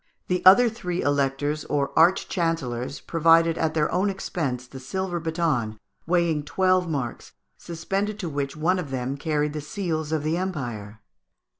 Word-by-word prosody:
The 180 0 0
other 240 +6 +8
three 185 -6 -3
Electors, 145 +1 0
or 140 -1 -1
arch 175 +4 +4
chancellors, 145 -7 -2
provided 165 0 +3
at 160 -1 0
their 150 -1 +1
own 190 +3 +1
expense 145 -10 -3
the 130 +1 -10
silver 175 +6 -3
baton, 160 -10 -1 0.3
weighing 170 -3 +2
twelve 185 +3 +1
marks, 135 -6 -4 0.3
suspended 195 +5 -3
to 185 - -4
which 140 -2 -3
one 180 +4 +1
of 165 -6 -5
them 130 0 -3
carried 150 0 -1
the 155 - -4
seals 160 -1 -3
of 155 -2 0
the 155 +2 0
empire. 120 - -5
160 Hz, 155 wpm, -25 LUFS, 140-180 Hz, 0.3 s, other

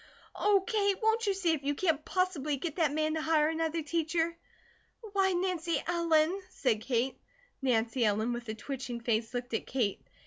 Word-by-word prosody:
Oh, 405 -2 +3
Kate, 405 -4 +1
won't 445 0 +2
you 395 - +2
see 370 -3 +1
if 315 -3 0
you 285 +1 0
can't 320 -3 +1
possibly 320 -7 0
get 320 +3 -4
that 320 -4 +3
man 310 +1 0
to 315 - -1
hire 310 -1 +3
another 325 0 -1
teacher?" 330 +2 0 0.8
"Why, 385 -1 +3
Nancy 350 -2 0
Ellen 335 +1 +2
" - - -29
said 240 -11 0
Kate. 250 +1 -1 0.4
Nancy 240 -1 +1
Ellen, 220 +2 +1
with 240 -1 -6
a 220 - -3
twitching 250 0 -5
face, 225 -1 0
looked 245 -1 -4
at 225 - -2
Kate. 235 -7 -1
310 Hz, 180 wpm, -31 LUFS, 250-350 Hz, 0.8 s, Oh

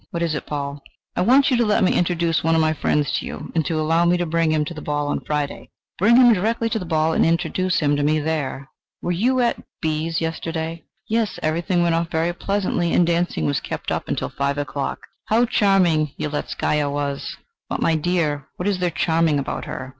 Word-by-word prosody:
"What 170 0 -3
is 165 -2 0
it, 150 - -4
Paul?" 140 -1 -4 0.3
"I - - 0
want 265 +8 +4
you 250 - +3
to 240 - +3
let 210 -2 +2
me 185 - +3
introduce 170 -2 +1
one 165 +1 +3
of 160 - +3
my 155 0 +2
friends 150 -1 0
to - - -7
you, - - -7
and 160 - +1
to 160 -2 -1
allow 165 +2 +2
me 175 +1 +3
to 175 - -1
bring 165 -1 +1
him 155 -1 +1
to 170 - -6
the 155 - -8
ball 145 0 -2
on - - -1
Friday." 150 -1 -3 0.3
"Bring 220 +6 +5
him 245 -1 +7
direct 220 +4 0
to 220 - 0
the 180 - -7
ball 160 0 +1
and - - +3
introduce 175 +2 +1
him 145 -1 +2
to 145 - -1
me 155 +2 +2
there. 145 -3 -3 0.4
Were 175 - -1
you 250 +9 +2
at 240 - 0 0.2
B 155 0 -1
's 165 - -1
yesterday?" 165 0 -4 0.2
"Yes; 225 -2 0
everything 170 +3 +1
went 170 -1 +2
off 165 0 0
very 165 +1 0
pleasantly, 185 -2 -1
and 175 - +4
dancing 170 - 0
was 70 - +1
kept - - -5
up - - -2
until - - -2
five 140 0 -2
o'clock. 145 -1 -3 0.3
How 230 +3 +3
charming 180 - +2
Yeletzkaya 150 0 -1
was!" 140 -1 -3 0.3
"But, - - -2
my 165 - +2
dear, 155 -3 0
what 180 - -3
is 200 -3 0
there 180 -1 +1
charming 165 -2 +1
about 140 - -3
her? 130 - -6
165 Hz, 220 wpm, -22 LUFS, 150-180 Hz, 0.4 s, him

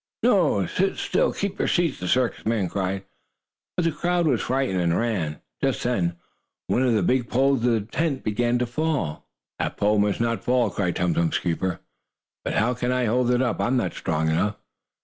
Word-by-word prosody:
"No! 180 - +3
Sit 190 - 0
still! - - +1
Keep 200 0 -3
your - - +1
seats!" 170 -6 +1
the 90 - -4
circus 125 +4 +1
men 110 -4 0
cried, 95 0 -2 0.7
but 180 - +2
the 165 - +2
crowd 175 +3 0
was 135 -7 +2
frightened 130 -8 0
and 85 -1 +2
ran. 95 -10 -1 0.2
Just - - 0
then, 90 -9 0 0.5
one 125 - +1
of 125 -3 +3
the 105 - +2
big 125 -2 +1
poles 135 -1 +2
of 125 - +3
the 115 -2 +2
tent 135 +6 -2
began 120 +3 +1
to 125 - 0
fall. 125 - -2 0.3
"That - - -2
pole 105 +1 +2
must 105 0 +1
not 115 -3 0
fall!" 125 -4 +2
cried 90 -4 -1
Tum 90 -1 +1
Tum's 85 0 +1
keeper. 90 +1 -2 0.6
"But - - -2
how 120 +4 +2
can 125 +1 -1
I 125 -1 +1
hold 120 +2 +2
it 125 +1 +3
up? 125 - -1
I - - +1
am 130 +2 +2
not - - -1
strong 80 -2 -1
enough." 90 +7 +1
120 Hz, 205 wpm, -24 LUFS, 95-130 Hz, 0.7 s, No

